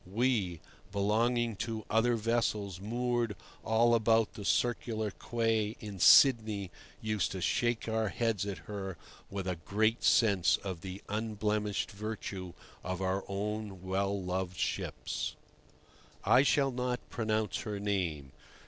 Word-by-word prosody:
We, 100 -5 0 0.3
belonging 115 +3 +1
to 110 +1 -4
other 115 +2 +3
vessels 105 -4 0
moored 120 0 -1 0.3
all 115 +2 +3
about 115 -1 +3
the 105 - -8
Circular 110 0 0
Quay 115 -1 0
in 105 -3 -7
Sydney, 110 -6 +6 0.3
used 110 -3 0
to 95 - -4
shake 120 +6 0
our 110 -1 0
heads 110 -4 -1
at 100 -3 -3
her 95 -4 -5 0.3
with 100 -1 -4
a 90 -2 -1
great 110 +8 0
sense 100 -6 +4
of 95 -4 -5
the 95 +2 -7
unblemished 105 -1 -1
virtue 100 -3 -5 0.3
of 95 -1 -3
our 95 +1 0
own 100 -1 -4
well 100 +1 0
loved 90 0 -3
ships. - - -2 0.9
I 120 +6 +6
shall 140 -1 +3
not 125 0 -3
pronounce 110 -3 0
her 105 -2 -4
name. 90 -9 -2
105 Hz, 130 wpm, -32 LUFS, 95-115 Hz, 0.9 s, Sydney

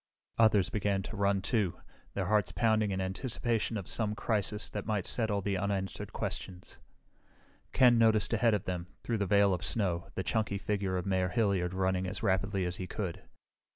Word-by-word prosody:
Others 105 -4 +4
began 100 -2 0
running, 100 -2 +1
too, 105 -6 0 0.4
their 95 - -1
hearts 105 -1 +2
pounding 110 -2 +2
in 95 -1 -2
anticipation 115 +4 -1
of 95 - -6
some 105 -2 -1
crisis 105 -1 0
that 105 - -5
might 105 -4 0
settle 110 -4 0
the 100 0 -1
unanswered 95 -1 -3
questions. 90 -1 -5 0.9
Ken 125 -3 +5
noticed 110 -1 +3
ahead 115 -1 +3
of 100 - -3
them, 90 -1 -4 0.2
through 115 -2 -1
the 100 - 0
veil 100 -1 +4
of 90 0 -3
snow, 90 -6 -1
the 95 - -2
chunky 110 -2 0
figure 100 -2 -1
of 90 - -3
Mayor 95 -1 +1
Hilliard 95 -3 +1
running 95 0 0
as 95 +4 -5
rapidly 95 -1 +1
as 90 0 -3
he 90 - -5
could. 95 -5 -4
100 Hz, 175 wpm, -31 LUFS, 95-110 Hz, 0.9 s, Ken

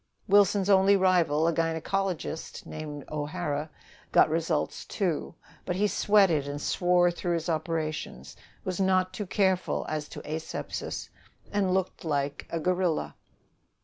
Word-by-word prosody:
Wilson's 200 -1 +4
only 195 0 +5
rival, 170 -5 +3
a 170 - +2
gynecologist 165 +1 -2
named 150 -2 -7
O'Hara, 150 0 -3 0.4
got - - +5
results, 160 -1 -1
too; 175 -5 -2 0.3
but 180 - -2
he 200 +3 +2
sweated 195 -8 +3
and 145 0 -4
swore 175 +2 +3
through 175 0 -2
his 165 +1 -3
operations, 155 - -3 0.3
was 185 -1 -2
not 185 -1 +2
too 210 - -4
careful 190 -1 +1
as 155 -1 -3
to - - -8
asepsis, 155 +1 -5 0.4
and 195 -2 +1
looked 190 -1 -2
like 145 -3 -2
a 165 - -2
gorilla. 180 -1 0
175 Hz, 130 wpm, -28 LUFS, 155-190 Hz, 0.4 s, only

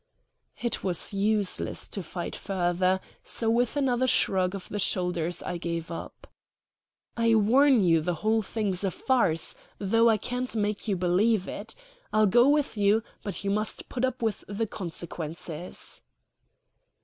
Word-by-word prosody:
It 235 -1 -2
was 180 +1 +2
useless 205 0 0
to 200 - -4
fight 175 +1 -5
further, 185 0 0 0.2
so 225 -1 +1
with 245 +4 +1
another 260 -2 +2
shrug 185 -5 +2
of 195 - -7
the 210 - -4
shoulders 180 -3 0
I 175 - -3
gave 170 -1 -4
up. 165 - -8 0.9
"I 230 -1 +3
warn 245 +3 +5
you 165 -3 +4
the 175 +2 -1
whole 220 +6 +1
thing's 205 -3 -2
a 195 - +2
farce, 185 - +1 0.2
though 225 +4 +3
I 220 - +4
can't 250 +3 -3
make 210 0 -1
you 200 - +1
believe 185 +3 +2
it. 210 +2 -7 0.4
I'll 215 0 +4
go 240 +6 +5
with 290 -5 +1
you; 205 +2 +3 0.2
but 200 - -4
you 195 - 0
must 215 +1 -2
put 250 - -3
up 260 -2 -1
with 220 -3 -1
the 205 +3 -2
consequences." 170 -3 -6
205 Hz, 150 wpm, -27 LUFS, 180-230 Hz, 0.9 s, warn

